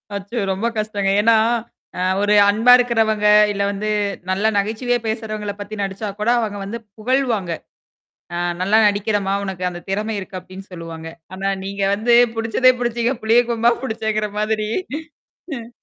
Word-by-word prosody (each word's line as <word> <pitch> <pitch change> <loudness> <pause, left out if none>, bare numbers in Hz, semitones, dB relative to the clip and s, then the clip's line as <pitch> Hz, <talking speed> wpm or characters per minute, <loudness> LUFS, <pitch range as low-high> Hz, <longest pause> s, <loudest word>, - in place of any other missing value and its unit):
அச்சோ! 200 +4 -6
ரொம்ப 190 +4 -2
கஷ்டங்க. 210 -2 -1
ஏன்னா 225 +1 +5 0.6
அ - - -1 0.2
ஒரு 205 0 +3 0.2
அன்பா 225 +4 +4
இருக்கிறவங்க, 225 -3 +1 0.3
இல்ல 200 -1 -3
வந்து 205 +1 -3 0.4
நல்லா 195 +4 +2
நகைச்சுவையா 225 +5 0
பேசுறவங்கள 215 -2 -3
பத்தி 205 +1 -6
நடிச்சா 195 +2 -4
கூட, 210 +2 0
அவங்க 210 -3 -3
வந்து 220 +4 -5 0.2
புகழ்வாங்க. 230 -5 0 0.8
ஆ - - -2 0.2
நல்லா 200 +4 +3
நடிக்கிறம்மா! 205 -1 0
உனக்கு 190 -2 -5
அந்த 175 -1 -8
திறமை 210 +3 -2
இருக்கு, 190 -1 -7
அப்படின்னு 185 +1 -11
சொல்லுவாங்க. 165 -2 -8 0.3
ஆனா 195 +1 -3 0.2
நீங்க 200 +1 -5
வந்து, 235 +3 +3 0.2
புடிச்சதே 230 +3 +3
புடிச்சீங்க, 240 +1 0
புளியம் 235 +2 +3
கொம்பா 235 0 +3
புடிச்சேங்கிற 220 -3 -2
மாதிரி 215 0 -1 0.9
ம். 230 0 -9
215 Hz, 145 wpm, -20 LUFS, 200-225 Hz, 0.9 s, ஏன்னா